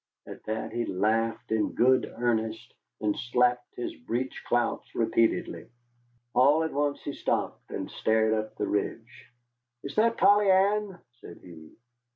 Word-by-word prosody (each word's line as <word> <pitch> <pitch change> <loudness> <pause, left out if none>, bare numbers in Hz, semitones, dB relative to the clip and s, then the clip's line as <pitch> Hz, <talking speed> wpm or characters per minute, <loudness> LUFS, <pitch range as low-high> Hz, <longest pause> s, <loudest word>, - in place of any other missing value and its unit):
At - - -10
that 110 0 -3
he 120 +1 -2
laughed 110 +4 -1
in 110 -1 0
good 130 +1 +3
earnest, 110 -2 -1 0.3
and 105 -1 0
slapped 125 0 0
his 120 - -4
breech 125 +2 -4
clouts 120 -1 -1
repeatedly. 115 0 0 0.6
All 145 +5 +4
at 160 - -3
once 145 0 -1
he 145 - -4
stopped, - - -2
and - - -4
stared 110 0 +1
up 110 0 -3
the 105 - -2
ridge. 115 +4 -4 0.5
"Is 140 - -6
that 230 +1 +3
Polly 205 0 +5
Ann?" 195 0 +2 0.2
said - - -12
he. 80 -3 -13
120 Hz, 145 wpm, -28 LUFS, 110-140 Hz, 0.6 s, Polly